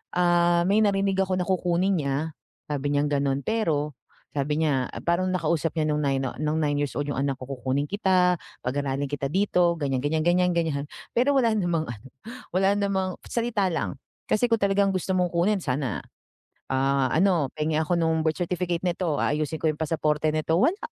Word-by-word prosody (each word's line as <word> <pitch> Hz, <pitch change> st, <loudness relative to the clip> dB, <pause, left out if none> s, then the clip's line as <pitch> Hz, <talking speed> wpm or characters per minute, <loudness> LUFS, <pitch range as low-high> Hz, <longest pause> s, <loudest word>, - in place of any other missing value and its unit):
ah, 175 Hz, -1 st, +3 dB
may 200 Hz, +3 st, +3 dB
narinig 195 Hz, -2 st, +2 dB
ako 190 Hz, -1 st, +1 dB
na 180 Hz, -, -1 dB
kukunin 185 Hz, +1 st, +1 dB
niya, 145 Hz, +3 st, -1 dB, 0.3 s
sabi 145 Hz, -2 st, -2 dB
niyang 145 Hz, +1 st, +1 dB
gano'n. 140 Hz, -1 st, 0 dB
Pero, 155 Hz, -10 st, 0 dB, 0.4 s
sabi 150 Hz, +2 st, -1 dB
niya, 135 Hz, -5 st, +1 dB, 0.2 s
parang 175 Hz, +2 st, +1 dB
nakausap 165 Hz, -2 st, 0 dB
niya 155 Hz, -2 st, +1 dB
no'ng 150 Hz, 0 st, 0 dB
9 135 Hz, -1 st, +1 dB
o 130 Hz, -, -3 dB
no'ng 155 Hz, +1 st, 0 dB
nine-years-old 145 Hz, -1 st, -1 dB
yung 140 Hz, -, -3 dB
anak 140 Hz, -1 st, -1 dB
ko, 130 Hz, -, -8 dB
"Kukunin 135 Hz, +2 st, -1 dB
kita, 185 Hz, -3 st, +2 dB, 0.3 s
pag-aralin 140 Hz, +2 st, -1 dB
kita 140 Hz, -1 st, -3 dB
dito", 180 Hz, -1 st, +2 dB
ganyan-ganyan, 145 Hz, +1 st, 0 dB
ganyan-ganyan. 170 Hz, -5 st, +1 dB, 0.3 s
Pero, 270 Hz, +4 st, +3 dB
wala 230 Hz, -4 st, +3 dB
namang 175 Hz, -6 st, 0 dB
ano, 115 Hz, +1 st, -8 dB, 0.4 s
wala 190 Hz, +2 st, +3 dB
namang 190 Hz, -2 st, -1 dB
salita 230 Hz, -5 st, 0 dB
lang. 160 Hz, -, -2 dB, 0.3 s
Kasi, 240 Hz, +3 st, +2 dB
kung 230 Hz, -, +3 dB
talagang 200 Hz, 0 st, +3 dB
gusto 190 Hz, 0 st, -1 dB
mong 180 Hz, -1 st, +1 dB
kunin 190 Hz, +4 st, +2 dB
sana, 130 Hz, -, -2 dB, 0.7 s
ah, 135 Hz, 0 st, +2 dB
ano, 170 Hz, -5 st, +2 dB
"Penge 155 Hz, +1 st, 0 dB
ako 165 Hz, +3 st, 0 dB
no'ng 160 Hz, -1 st, +1 dB
birth 160 Hz, +1 st, 0 dB
certificate 175 Hz, 0 st, -1 dB
nito, 175 Hz, -3 st, 0 dB
aayusin 155 Hz, +1 st, -1 dB
ko 160 Hz, -, 0 dB
yung 155 Hz, -1 st, -1 dB
pasaporte 155 Hz, -1 st, +1 dB
nito", 155 Hz, +1 st, 0 dB
wala. 320 Hz, -, +2 dB
165 Hz, 170 wpm, -25 LUFS, 145-185 Hz, 0.7 s, ah